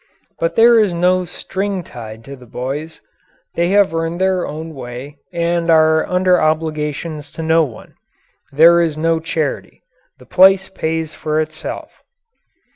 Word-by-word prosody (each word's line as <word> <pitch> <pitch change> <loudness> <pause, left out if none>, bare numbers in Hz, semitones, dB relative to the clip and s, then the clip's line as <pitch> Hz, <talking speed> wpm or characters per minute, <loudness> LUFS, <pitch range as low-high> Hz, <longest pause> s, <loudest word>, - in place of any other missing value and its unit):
But 165 0 -1
there 230 0 +6
is 200 -5 +1
no 180 +1 +2
string 195 +2 -4
tied 110 -5 -10
to 140 +3 -9
the 125 -2 -16
boys. 140 +7 -5 0.5
They 170 +1 0
have 200 -3 +3
earned 165 +1 -2
their 190 -1 +1
own 160 +2 -7
way 130 +2 -8
and 170 0 -1
are 160 -1 +4
under 180 0 +2
obligations 155 -1 -2
to 165 - -6
no 160 +1 +3
one. 120 -8 -9 0.6
There 170 +4 +6
is 160 -3 -1
no 165 +1 +1
charity. 160 -2 -4 0.3
The - - -17
place 190 +1 +4
pays 160 -3 -3
for 155 0 -2
itself. 155 0 -6
165 Hz, 145 wpm, -18 LUFS, 155-180 Hz, 0.6 s, there